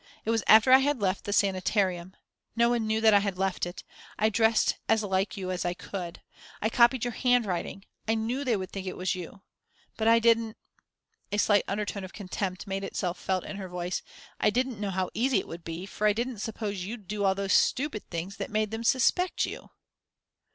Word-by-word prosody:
It 225 - +1
was 225 -1 +1
after 220 +4 +7
I 260 - +9
had 285 -1 +1
left 195 -1 -1
the 205 - -3
sanitarium 190 -2 +1 0.4
no 235 0 +4
one 235 -2 0
knew 220 0 0
that 220 -1 +6
I 205 - +7
had 200 -2 -2
left 190 -2 -1
it. 175 - -8 0.3
I 215 - +3
dressed 225 +1 +2
as 220 -1 +3
like 195 +1 -1
you 185 -1 -3
as 180 - -2
I 175 0 -1
could, 180 -3 -7 0.4
I 220 - 0
copied 240 +1 +4
your 240 - -2
handwriting, 215 -6 0 0.2
I 225 - +2
knew 235 +5 -2
they 240 -5 +1
would 185 -1 -6
think 195 -1 -6
it 185 - -5
was 185 +1 0
you. 185 +2 -8 0.5
But 220 - 0
I 230 0 +7
didn't" 230 -1 +2 0.7
a 205 - 0
slight 205 -1 +3
undertone 205 0 -3
of 185 - -9
contempt 190 -2 -4
made 195 0 -3
itself 180 -2 -3
felt 185 -1 -1
in 200 - -6
her 190 -2 -6
voice 180 0 -3 0.4
"I - - +4
didn't 250 0 -1
know 205 -1 -2
how 185 -1 -2
easy 250 +3 +2
it 190 - -2
would 170 +1 -8
be, 165 +3 -6
for 210 +2 -1
I 210 - +4
didn't 235 0 -3
suppose 210 -3 -4
you'd 210 0 -7
do 210 +1 -3
all 190 -1 +3
those 195 -1 -1
stupid 260 -5 +1
things 175 +3 -5
that - - -4
made 215 0 0
them 225 +1 -4
suspect 270 +10 +2
you." - - -8
205 Hz, 215 wpm, -28 LUFS, 190-225 Hz, 0.7 s, I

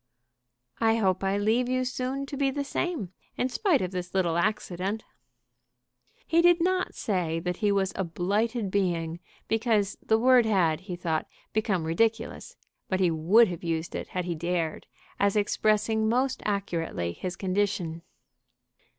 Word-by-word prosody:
"I 225 -1 +3
hope 190 -4 +1
I 195 +1 +1
leave 225 +4 +1
you 255 0 +1
soon 255 +2 -2
to 280 - -6
be 275 0 +1
the 280 +1 -2
same, 280 - -3 0.2
in 255 - 0
spite 345 - +2
of 180 - -3
this 180 0 -5
little 175 -3 +2
accident." 195 +2 -1 1.2
He 335 +1 +3
did 350 0 +5
not 370 +2 0
say 175 -6 -1
that 180 +1 -2
he 210 -2 +2
was 195 -1 +1
a 190 - -1
blighted 200 +5 -1
being, 170 -4 0 0.3
because 220 -3 +1
the 220 - +2
word 245 0 +5
had, 170 -7 +2
he 185 -1 -6
thought, 165 -3 -2 0.3
become 205 -5 0
ridiculous; 225 +8 -1 0.3
but 185 - 0
he 180 -3 +3
would 180 +9 +5
have 175 -1 -6
used 165 -1 -2
it - - -4
had 180 -1 -3
he 175 - -1
dared, 170 0 -2 0.3
as 200 0 +2
expressing 215 +1 +2
most 255 +3 +1
accurately 170 - -2
his 180 - -5
condition. 185 -4 -1
200 Hz, 155 wpm, -27 LUFS, 175-230 Hz, 1.2 s, did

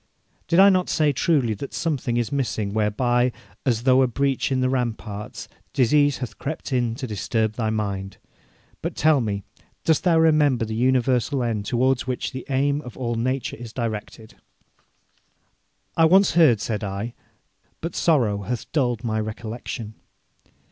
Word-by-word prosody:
'Did 170 +2 +3
I 195 +1 +9
not 185 -1 +1
say 150 -2 +2
truly 135 -5 +2
that 120 +7 -7
something 135 -7 -1
is 120 -2 -1
missing, 110 -7 -1
whereby, 120 +4 +1 0.4
as 115 -3 +2
through 130 +1 +4
a 130 - +4
breach 135 +2 0
in 130 - +1
the 130 - +2
ramparts, 115 -5 -3 0.3
disease 145 +1 +3
hath 120 -5 -7
crept 145 -1 -4
in 120 -3 +1
to 130 - -5
disturb 110 0 -1
thy 110 -1 -1
mind? 100 -3 -3 0.6
But, - - -4
tell 155 -3 +3
me, 100 -3 -2 0.4
dost 160 -2 +2
thou 170 -3 +4
remember 150 -7 +3
the 110 - -5
universal 125 +2 +1
end 110 -4 -2
towards 130 +1 +1
which 125 -1 -2
the 130 - -7
aim 140 +2 +1
of 125 -5 -11
all 120 -2 -2
nature 130 +2 -2
is 115 -1 -9
directed?' 110 -1 -5 1.6
'I 165 - +5
once 190 +4 +5
heard,' 150 -11 +5
said 110 -1 -2
I, 100 +4 -4 0.7
'but 165 - -5
sorrow 120 -11 +2
hath 115 +3 -5
dulled 125 -6 0
my 110 -2 -1
recollection.' 110 +1 -5
125 Hz, 155 wpm, -23 LUFS, 110-140 Hz, 1.6 s, I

